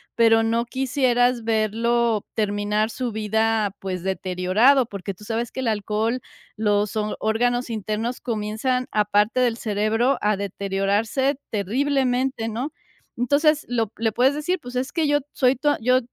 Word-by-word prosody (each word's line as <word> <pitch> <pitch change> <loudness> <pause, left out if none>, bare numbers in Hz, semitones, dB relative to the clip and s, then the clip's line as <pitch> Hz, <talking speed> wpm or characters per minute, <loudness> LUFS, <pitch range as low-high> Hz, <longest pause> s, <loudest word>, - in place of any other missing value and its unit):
pero 225 -1 +5
no 230 +1 +1
quisieras 250 -2 +1
verlo 225 0 +1
terminar 210 0 0
su 245 0 -3
vida, 220 -1 0
pues, 185 -2 -4
deteriorado, 190 +8 +2
porque 200 -2 -6
tú 200 +3 -16
sabes 230 +1 -2
que - - -7
el 255 - -2
alcohol, 220 +3 -1 0.4
los 210 -1 +1
o 215 0 -1
órganos 245 +3 0
internos 220 +2 -3
comienzan, 235 +3 -1
aparte 210 +3 +2
del 240 -2 +1
cerebro, 225 +4 +1
a 210 -1 +1
deteriorarse 200 +7 0
terriblemente, 255 +2 0
¿no?, 250 +7 -3 0.5
entonces 290 +5 +2
lo 225 -4 -1
le 225 0 0
puedes 260 +5 +3
decir: 320 +5 -1
"Pues, 245 0 -9
es 255 +2 -2
que 325 -3 +1
yo 290 0 +3
soy 255 0 +3
tu 295 +4 +1
a 290 - +1
yo 255 +2 +4
225 Hz, 150 wpm, -23 LUFS, 210-255 Hz, 0.5 s, pero